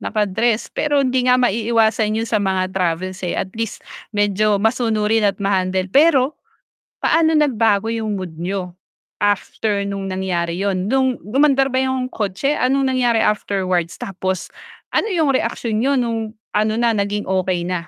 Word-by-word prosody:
naka-dress 215 +2 0
pero 290 -2 +1
hindi 255 0 +1
nga 250 - +6
maiiwasan 225 -2 +1
'yon 225 - -1
sa 220 -2 0
mga 190 -1 -1
travels, 185 +1 -2
eh, 180 -2 -3
at 190 - -3
least 225 -1 -5 0.3
medyo 205 0 +2
masunurin 220 -1 +1
at 195 - -2
na-handle. 190 -2 0
Pero 280 -2 +4 0.6
paano 325 -1 +3
nagbago 225 -8 +2
'yong 225 -1 -2
mood 175 -4 -7
n'yo 180 +1 -4 0.5
after 205 0 0
no'ng 195 -1 -4
nangyari 180 -2 -2
'yon 195 +1 -1
no'ng 260 -1 +1
umandar 275 -1 +3
ba 260 - +1
'yong 260 -1 -1
kotse, 210 +8 -1
anong 265 +1 +2
nangyari 245 -3 +2
afterwards 185 -5 0
tapos 190 -1 -4 0.4
ano - - +1
'yong 320 -8 +1
reaksyon 230 -3 -1
niyo 275 +3 +2
no'ng 225 -3 -2 0.2
ano 215 +1 +1
na 235 0 +2
naging 205 -1 -1
okay 185 -2 -1
na? 175 -1 -3
215 Hz, 150 wpm, -19 LUFS, 190-250 Hz, 0.6 s, nga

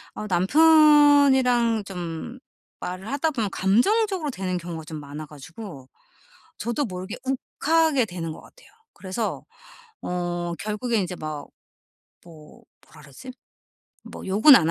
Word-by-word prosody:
어 210 - -5
남편이랑 275 - +5
좀 180 +6 -6 0.4
말을 185 +5 -6
하다 290 +3 0
보면 225 -8 -2
감정적으로 315 - +1
되는 185 -5 -3
경우가 170 -2 -7
좀 155 -1 -7
많아 145 +2 -8
가지고 150 - -11 0.7
저도 235 +6 -1
모르게 185 0 -6
욱하게 280 +2 +1
되는 170 -4 -5
것 - - -11
같아요. - - -19 0.3
그래서 195 +4 -4 0.6
어 175 -1 -3
결국에 215 +2 -1
이제 180 0 -4
막 155 -2 -6 0.8
뭐 155 -3 -15 0.3
뭐라 - - -16
그러지? 140 - -11 0.7
뭐 - - -10
욕은 215 +10 +7
안 165 -1 +2
205 Hz, 255 characters per minute, -24 LUFS, 175-265 Hz, 0.8 s, 욕은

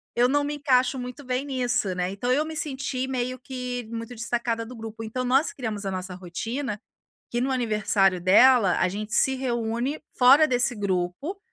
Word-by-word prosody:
Eu 240 +1 +4
não 290 +2 +2
me 295 +1 -2
encaixo 260 -2 +2
muito 250 +3 -7
bem 255 +2 -2
nisso, 245 -8 -1
né. 180 0 -1
Então, 225 +6 -2
eu 290 +4 +3
me 320 0 -6
senti 265 -3 -3
meio 255 0 -2
que 250 -3 -5
muito 230 +1 -6
destacada 230 0 -2
do 250 +2 -10
grupo. 225 0 -8
Então, 255 +3 -3
nós 265 +5 +2
criamos 220 -7 -4
a 195 - -2
nossa 185 0 -5
rotina, 210 +6 -4 0.5
que 240 - -1
no 265 +1 0
aniversário 210 -6 +2
dela, 200 +2 +5
a 185 - +3
gente 210 +3 -5
se 265 +2 +4
reúne 240 +2 -2 0.2
fora 275 +5 +7
desse 245 -1 +2
grupo, 200 - -2
245 Hz, 180 wpm, -25 LUFS, 215-260 Hz, 0.5 s, fora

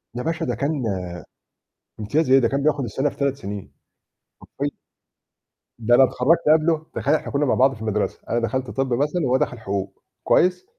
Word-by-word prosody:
يا 125 - -3
باشا 165 0 -2
ده - - -2
كان 140 +3 -1 1.3
امتياز 145 +7 0
إيه؟ 135 - +7
ده 115 -3 +2
كان 140 0 -1
بياخد 145 -3 +1
السنة 135 +5 -1
في - - -16
3 140 -1 0
سنين، 100 -6 -7 0.7
حرفيًّا. 145 +1 -5 1.0
ده 120 +2 +4
أنا 135 - +7
اتخرجت 130 +6 +3 0.2
قبله. 160 0 0
تخيّل 145 +3 +2
إحنا - - -4
كنّا 145 +1 +1
مع - - +2
بعض 135 +1 +4
في 110 - -14
المدرسة. 105 -1 -2
أنا 120 - +1
دخلت 130 +2 -2
طِبّ 135 -2 -1
مثلًا 150 +7 0
وهو 130 +1 +3
دخل 125 -3 -2
حقوق. 100 -2 -5 0.2
كويّس، 180 - +2
135 Hz, 185 wpm, -22 LUFS, 120-150 Hz, 1.3 s, إيه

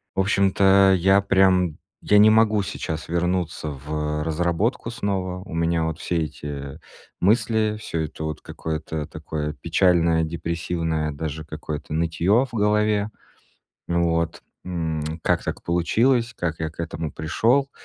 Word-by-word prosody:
в 95 - +3
общем-то, 95 -1 +4
я 95 +3 +4
прям, 95 -4 +3 0.2
я 105 - +4
не 110 +1 +8
могу 110 -2 +4
сейчас 80 -4 -5
вернуться 85 -2 -1
в, 75 +2 -3
э, - - -1
разработку 85 +9 0
снова. 95 -4 -3
У 100 - -10
меня 85 0 +1
вот 80 0 -3
все 85 - -1
эти 70 -2 -7 0.4
мысли, 110 +1 +2
всё 85 -6 -3
это 80 - -8
вот 80 -1 -4
какое-то 80 -1 -5
такое 75 -1 -4
печальное, 85 -1 +2
депрессивное 80 -1 -2
даже 80 +1 -5
какое-то 75 -1 -6
нытьё 85 +9 +2
в 125 - -17
голове. 105 0 +2 0.8
Вот. 85 -1 0 0.2
М. 80 -4 -2 0.2
"Как - - +1
так - - -4
получилось? 115 +8 +1
Как 80 -2 -3
я 80 - -1
к 80 - -10
этому 80 -2 -4
пришёл? 120 - +1
85 Hz, 140 wpm, -23 LUFS, 80-100 Hz, 0.8 s, не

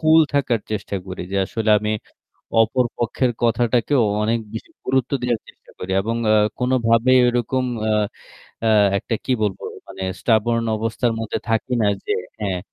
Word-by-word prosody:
কুল 160 0 +6
থাকার 130 -5 +1
চেষ্টা 100 -1 -3
করি। 95 - -6
যে - - 0
আসলে 110 +1 -1
আমি 105 +1 -2 0.7
অপর 125 +3 +1
পক্ষের 120 +2 0
কথাটাকেও 120 +3 +2 0.2
অনেক 115 +2 +1
বেশি 110 - -7 0.2
গুরুত্ব 130 -1 +1
দেওয়ার 120 -2 0
চেষ্টা - - -18
করি 90 - -6
এবং 115 +3 -2 0.2
আ - - +5 0.2
কোনভাবেই 125 0 +3
ঐরকম 120 +2 0 0.3
আ - - +3 0.8
আ - - +4 0.3
একটা 115 - -2
কি 130 - -1
বলবো 100 -3 -2 0.2
মানে 95 0 -7 0.2
stubborn 115 0 +2
অবস্থার 115 +2 -1
মধ্যে 110 -1 -3
থাকি 115 +3 0
না 105 - +3 0.2
যে - - 0 0.3
হ্যাঁ, 95 -4 -2
115 Hz, 155 wpm, -21 LUFS, 110-125 Hz, 0.8 s, কুল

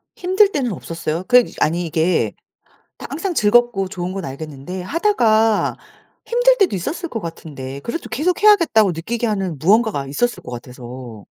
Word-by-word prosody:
힘들 380 +3 +3
때는 265 - -1
없었어요? 165 -1 -4
그냥 250 -1 +5
아니 170 +3 +1
이게 165 +2 +1 0.7
항상 345 +5 -4
즐겁고 215 - +3
좋은 180 0 -4
건 195 -1 -5
알겠는데 150 +5 -7
하다가 225 - +2 0.5
힘들 - - +4
때도 385 - +2
있었을 315 - -4
것 225 - -4
같은데 140 -6 -7
그래도 235 - -5
계속해야겠다고 335 - +3
느끼게 225 +9 -3
하는 195 -7 -2
무언가가 200 - +2
있었을 240 - -1
것 - - -9
같아서. 120 -2 -9
195 Hz, 350 characters per minute, -20 LUFS, 160-260 Hz, 0.7 s, 그냥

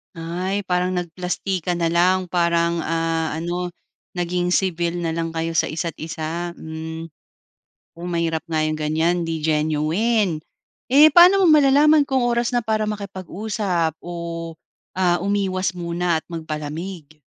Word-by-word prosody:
Ay, 180 +4 -3
parang 180 0 +1
nagplastikan 180 0 -2
na 165 - +2
lang 180 +2 +2
parang 170 -1 +1
ah, 165 0 -1
ano 175 +3 -3 0.4
naging 175 0 -1
civil 175 -2 0
na 165 -1 -2
lang 165 0 -2
kayo 165 0 -3
sa - - +1
isa't 165 -1 -3
isa, 165 +2 -4
hmm. 160 0 -7 0.9
Oh, 175 +1 -7
mahirap 165 -2 -1
nga 160 -1 -1
yung 155 0 0
ganyan, 160 +3 +1
'di 160 -1 -2
genuine. 160 +5 +1 0.5
Eh 295 +3 +8
paano 370 +3 +8
mo - - +5
malalaman 295 +1 +6
kung 265 -2 +1
oras 235 +1 +1
na - - +4
para 215 -1 0
makipag-usap 195 -4 -2
o 170 -1 -5 0.5
ah, 175 -2 +3
umiwas 190 -2 0
muna 170 -1 -1
at - - -47
magpalamig? 155 0 -6
175 Hz, 135 wpm, -22 LUFS, 165-185 Hz, 0.9 s, Eh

